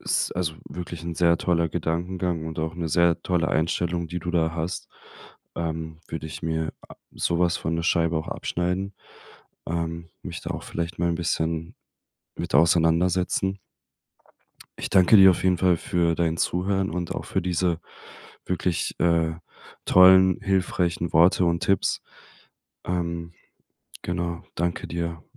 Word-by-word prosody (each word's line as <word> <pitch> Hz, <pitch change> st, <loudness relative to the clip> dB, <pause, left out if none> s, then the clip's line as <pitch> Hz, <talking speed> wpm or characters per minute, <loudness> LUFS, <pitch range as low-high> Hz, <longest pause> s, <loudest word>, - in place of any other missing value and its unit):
s -, -, 0 dB
also 85 Hz, -3 st, -2 dB
wirklich 85 Hz, -2 st, -7 dB
'n 85 Hz, 0 st, -4 dB
sehr 85 Hz, 0 st, +3 dB
toller 85 Hz, -2 st, +1 dB
Gedankengang 85 Hz, 0 st, -2 dB
und 80 Hz, 0 st, -6 dB
auch 80 Hz, +1 st, -2 dB
'ne 85 Hz, -2 st, -3 dB
sehr 85 Hz, +1 st, +3 dB
tolle 85 Hz, -3 st, +1 dB
Einstellung, 85 Hz, +1 st, 0 dB
die 90 Hz, +2 st, -3 dB
du 90 Hz, +1 st, -4 dB
da 80 Hz, -2 st, +1 dB
hast. 85 Hz, +2 st, -4 dB, 0.7 s
Ähm, 80 Hz, -1 st, -4 dB
würde 80 Hz, -1 st, -5 dB
ich 80 Hz, -, -8 dB
mir 80 Hz, -1 st, -2 dB, 0.2 s
a -, -, -11 dB, 0.2 s
sowas 85 Hz, 0 st, +1 dB
von 80 Hz, +1 st, -2 dB
'ne 85 Hz, -, -1 dB
Scheibe 85 Hz, -1 st, +2 dB
auch 80 Hz, -, -3 dB
abschneiden, 90 Hz, +3 st, -2 dB, 0.7 s
ähm, 85 Hz, 0 st, -3 dB
mich 85 Hz, -2 st, -6 dB
da -, -, -5 dB
auch -, -, -6 dB
vielleicht 85 Hz, 0 st, -4 dB
mal 85 Hz, 0 st, +1 dB
'n -, -, 0 dB
bisschen 80 Hz, -1 st, -2 dB, 0.6 s
mit -, -, -5 dB
auseinandersetzen. 85 Hz, +4 st, +3 dB, 1.2 s
Ich -, -, -4 dB
danke 95 Hz, +3 st, +6 dB
dir 95 Hz, -1 st, +9 dB
auf 90 Hz, -, -1 dB
jeden 95 Hz, -1 st, +3 dB
Fall 90 Hz, -1 st, +3 dB
für 85 Hz, -1 st, +1 dB
dein 80 Hz, -1 st, 0 dB
Zuhören 95 Hz, +3 st, 0 dB
und 85 Hz, 0 st, -3 dB
auch -, -, -4 dB
für 95 Hz, -, -1 dB
diese 90 Hz, -1 st, 0 dB, 0.6 s
wirklich, 90 Hz, -1 st, -1 dB
äh, 85 Hz, -2 st, +2 dB, 0.5 s
tollen, 95 Hz, 0 st, +7 dB
hilfreichen 90 Hz, -3 st, 0 dB
Worte 85 Hz, +2 st, +5 dB
und 85 Hz, 0 st, 0 dB
Tipps. 100 Hz, -, +1 dB, 0.8 s
Ähm, 85 Hz, -1 st, -3 dB, 0.7 s
genau, 85 Hz, -1 st, -3 dB
danke 85 Hz, 0 st, -2 dB
dir, 85 Hz, -1 st, -4 dB
85 Hz, 145 wpm, -25 LUFS, 80-90 Hz, 1.2 s, dir